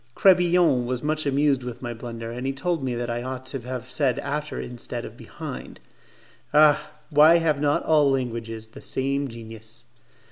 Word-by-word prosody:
Crebillon 175 Hz, -9 st, +4 dB
was 125 Hz, +1 st, -2 dB
much 155 Hz, 0 st, 0 dB
amused 140 Hz, -1 st, +2 dB
with 125 Hz, 0 st, -7 dB
my 120 Hz, -1 st, -3 dB
blunder, 115 Hz, 0 st, -7 dB
and 125 Hz, +2 st, -4 dB
he 135 Hz, -, 0 dB
told 165 Hz, +2 st, -1 dB
me 125 Hz, -2 st, -1 dB
that 120 Hz, 0 st, -2 dB
I 120 Hz, 0 st, -2 dB
ought 130 Hz, +1 st, -5 dB
to 135 Hz, +1 st, -3 dB
have 125 Hz, +1 st, -6 dB
said 135 Hz, -4 st, +1 dB
after 150 Hz, +2 st, -3 dB
instead 120 Hz, -1 st, -5 dB
of -, -, -9 dB
behind. -, -, -8 dB, 0.8 s
Ah! 150 Hz, 0 st, +5 dB, 0.2 s
why 150 Hz, +3 st, +7 dB
have 155 Hz, -4 st, +1 dB
not 145 Hz, -1 st, +2 dB
all 150 Hz, -3 st, +4 dB
languages 115 Hz, -4 st, -3 dB
the -, -, -12 dB
same 140 Hz, +1 st, -1 dB
genius! 115 Hz, 0 st, -7 dB
130 Hz, 175 wpm, -25 LUFS, 120-150 Hz, 0.8 s, why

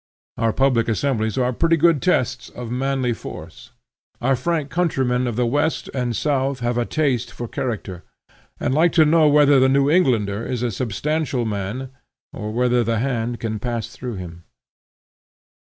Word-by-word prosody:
Our 115 Hz, -1 st, +1 dB
public 125 Hz, -2 st, +2 dB
assemblies 110 Hz, -1 st, 0 dB
are 125 Hz, -1 st, +1 dB
pretty 165 Hz, +6 st, +2 dB
good 165 Hz, -2 st, +3 dB
tests 130 Hz, -8 st, 0 dB
of 120 Hz, -2 st, -8 dB
manly 130 Hz, -1 st, 0 dB
force. -, -, -10 dB, 0.5 s
Our 135 Hz, +2 st, +2 dB
frank 150 Hz, +2 st, -2 dB
countrymen 130 Hz, -8 st, 0 dB
of 120 Hz, -, -2 dB
the 125 Hz, +1 st, +1 dB
west 145 Hz, +6 st, -1 dB
and 125 Hz, -3 st, -1 dB
south 135 Hz, -1 st, 0 dB
have 120 Hz, 0 st, 0 dB
a 120 Hz, -1 st, 0 dB
taste 135 Hz, -6 st, 0 dB
for 120 Hz, -, -6 dB
character, 105 Hz, -8 st, -4 dB, 0.6 s
and 125 Hz, -, 0 dB
like 160 Hz, +4 st, +3 dB
to 160 Hz, -3 st, +5 dB
know 155 Hz, 0 st, +4 dB
whether 145 Hz, -1 st, +5 dB
the 130 Hz, 0 st, +4 dB
New 140 Hz, +1 st, +3 dB
Englander 115 Hz, -, +2 dB
is 125 Hz, 0 st, -3 dB
a 120 Hz, -, 0 dB
substantial 130 Hz, +5 st, -2 dB
man, 110 Hz, +5 st, -4 dB, 0.4 s
or 105 Hz, -, -5 dB
whether 125 Hz, +1 st, +2 dB
the 115 Hz, 0 st, 0 dB
hand 120 Hz, -1 st, -2 dB
can 110 Hz, -2 st, -3 dB
pass 115 Hz, 0 st, -3 dB
through 120 Hz, 0 st, -6 dB
him. 85 Hz, -2 st, -8 dB
125 Hz, 165 wpm, -21 LUFS, 115-140 Hz, 0.6 s, to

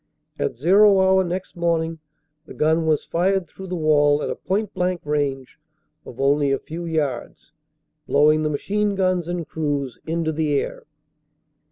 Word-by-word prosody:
At 70 Hz, -, -1 dB
"zero" 195 Hz, -, +5 dB
hour 190 Hz, 0 st, +4 dB
next 185 Hz, +2 st, -5 dB
morning 165 Hz, -1 st, -1 dB, 0.5 s
the -, -, -11 dB
gun 160 Hz, +1 st, +1 dB
was 155 Hz, -2 st, +1 dB
fired 185 Hz, +1 st, 0 dB
through 190 Hz, +3 st, -10 dB
the 180 Hz, -, -4 dB
wall 150 Hz, -2 st, +3 dB
at -, -, -2 dB
a -, -, -3 dB
point 200 Hz, +2 st, -2 dB
blank 180 Hz, -1 st, -1 dB
range 145 Hz, -3 st, -2 dB, 0.5 s
of 120 Hz, -, -11 dB
only 140 Hz, +1 st, +2 dB
a 135 Hz, -, +2 dB
few 165 Hz, +5 st, -7 dB
yards, 150 Hz, -7 st, -3 dB, 0.6 s
blowing 150 Hz, +2 st, +4 dB
the 155 Hz, -, 0 dB
machine 205 Hz, +7 st, -1 dB
guns 185 Hz, -3 st, 0 dB
and 175 Hz, -2 st, -4 dB
crews 145 Hz, -5 st, -3 dB
into 165 Hz, 0 st, -1 dB
the 150 Hz, -2 st, 0 dB
air. -, -, -6 dB
160 Hz, 160 wpm, -22 LUFS, 145-185 Hz, 0.6 s, zero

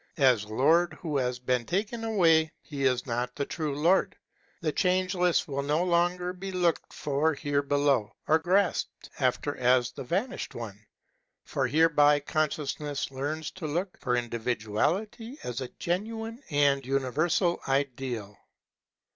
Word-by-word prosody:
As 130 Hz, -7 st, +4 dB
Lord 160 Hz, +11 st, +3 dB
who 155 Hz, -4 st, -5 dB
has 125 Hz, -2 st, 0 dB
been 125 Hz, 0 st, 0 dB
taken 210 Hz, -, -2 dB
away 165 Hz, -8 st, +3 dB
he 140 Hz, -3 st, -3 dB
is 125 Hz, -2 st, +2 dB
not 125 Hz, 0 st, -2 dB
the 140 Hz, -, -2 dB
true 150 Hz, -2 st, -3 dB
Lord. 175 Hz, +5 st, +3 dB, 0.4 s
The 160 Hz, -2 st, -1 dB
Changeless 180 Hz, 0 st, +1 dB
will 140 Hz, -1 st, -2 dB
no 150 Hz, +4 st, +1 dB
longer 180 Hz, 0 st, +1 dB
be 190 Hz, +1 st, -6 dB
looked 175 Hz, -3 st, 0 dB
for 150 Hz, +1 st, 0 dB
here 145 Hz, 0 st, 0 dB
below, 140 Hz, -6 st, +1 dB
or 160 Hz, +1 st, +4 dB
grasped 180 Hz, +3 st, 0 dB
after 135 Hz, +2 st, 0 dB
as 125 Hz, -1 st, +3 dB
the -, -, -7 dB
vanished 190 Hz, -, -2 dB
one. 105 Hz, -3 st, -8 dB, 0.6 s
For 135 Hz, -2 st, -1 dB
hereby 150 Hz, 0 st, +4 dB
consciousness 145 Hz, -1 st, -2 dB
learns 145 Hz, +4 st, -3 dB
to 180 Hz, -4 st, -6 dB
look 175 Hz, +5 st, -2 dB
for 125 Hz, -1 st, 0 dB
individuality 125 Hz, -, -2 dB
as 125 Hz, +1 st, -4 dB
a 130 Hz, -, -3 dB
genuine 225 Hz, +6 st, -3 dB
and 145 Hz, -2 st, +3 dB
universal 150 Hz, +7 st, +1 dB
ideal. 130 Hz, -6 st, -2 dB
145 Hz, 140 wpm, -28 LUFS, 130-175 Hz, 0.6 s, As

